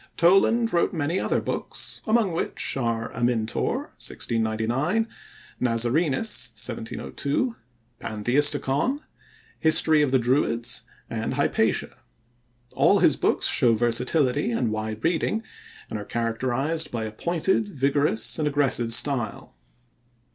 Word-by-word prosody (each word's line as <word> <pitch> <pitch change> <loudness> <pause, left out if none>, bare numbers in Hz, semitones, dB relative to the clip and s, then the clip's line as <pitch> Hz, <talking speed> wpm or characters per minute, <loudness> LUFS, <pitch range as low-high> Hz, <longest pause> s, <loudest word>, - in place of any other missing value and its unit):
Toland 210 +6 +4
wrote 170 - +2
many 165 +3 -1
other - - 0
books, - - -4
among 220 -3 +3
which 165 - -2
are 115 -3 -2
Amyntor 115 -2 -1
(1699); 115 - -1 0.5
Nazarenus 125 - 0
(1702); 140 - -3 0.5
Pantheisticon; 140 - +2 0.6
History 160 -1 +5
of 145 - +2
the 130 - +3
Druids; 120 -1 0 0.2
and - - -3
Hypatia. - - 0 0.7
All - - +4
his - - +4
books - - +1
show 115 -2 +4
versatility 125 +3 +1
and 115 -1 0
wide 110 0 -4
reading 175 +6 0 0.5
and 110 - -3
are 105 - -7
characterized 130 +8 -1
by 115 -2 -3
a 110 - -4
pointed, 175 - 0
vigorous, 140 - 0
and 150 - +1
aggressive 135 -5 +1
style. 120 -5 -1
130 Hz, 110 wpm, -25 LUFS, 115-160 Hz, 0.7 s, History